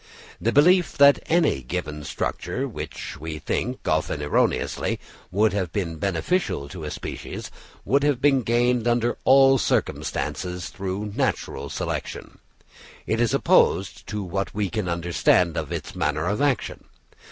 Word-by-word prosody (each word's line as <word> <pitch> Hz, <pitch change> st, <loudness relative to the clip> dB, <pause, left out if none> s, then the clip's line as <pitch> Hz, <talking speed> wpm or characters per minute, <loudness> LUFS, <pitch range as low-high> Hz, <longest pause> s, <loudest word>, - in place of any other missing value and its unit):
The 115 Hz, -, +1 dB
belief 175 Hz, +6 st, +4 dB
that 140 Hz, 0 st, +7 dB
any 160 Hz, -, +2 dB
given 75 Hz, +2 st, -4 dB
structure, -, -, -3 dB
which -, -, -7 dB
we 80 Hz, +1 st, -5 dB
think, 125 Hz, +10 st, -3 dB
often -, -, 0 dB
erroneously, 75 Hz, -, 0 dB, 0.3 s
would 105 Hz, +3 st, +2 dB
have 95 Hz, -5 st, -1 dB
been 85 Hz, -5 st, -3 dB
beneficial 95 Hz, -, -1 dB
to 80 Hz, -1 st, -7 dB
a -, -, -3 dB
species, -, -, -6 dB, 0.3 s
would 140 Hz, +7 st, +3 dB
have 145 Hz, -3 st, +2 dB
been 135 Hz, -1 st, +4 dB
gained 120 Hz, +1 st, +1 dB
under 120 Hz, 0 st, +1 dB
all 135 Hz, 0 st, +6 dB
circumstances 90 Hz, -5 st, -2 dB
through 100 Hz, +2 st, -4 dB
natural 135 Hz, 0 st, -2 dB
selection, -, -, -5 dB, 0.7 s
is 115 Hz, +1 st, +1 dB
opposed -, -, +2 dB
to 105 Hz, -1 st, -3 dB
what 95 Hz, +2 st, -3 dB
we 100 Hz, -3 st, -1 dB
can 105 Hz, -5 st, -2 dB
understand 85 Hz, 0 st, +2 dB
of -, -, -3 dB
its -, -, -5 dB
manner 75 Hz, +2 st, 0 dB
of 100 Hz, +8 st, -1 dB
action. 140 Hz, -6 st, -1 dB
105 Hz, 140 wpm, -24 LUFS, 90-130 Hz, 0.7 s, that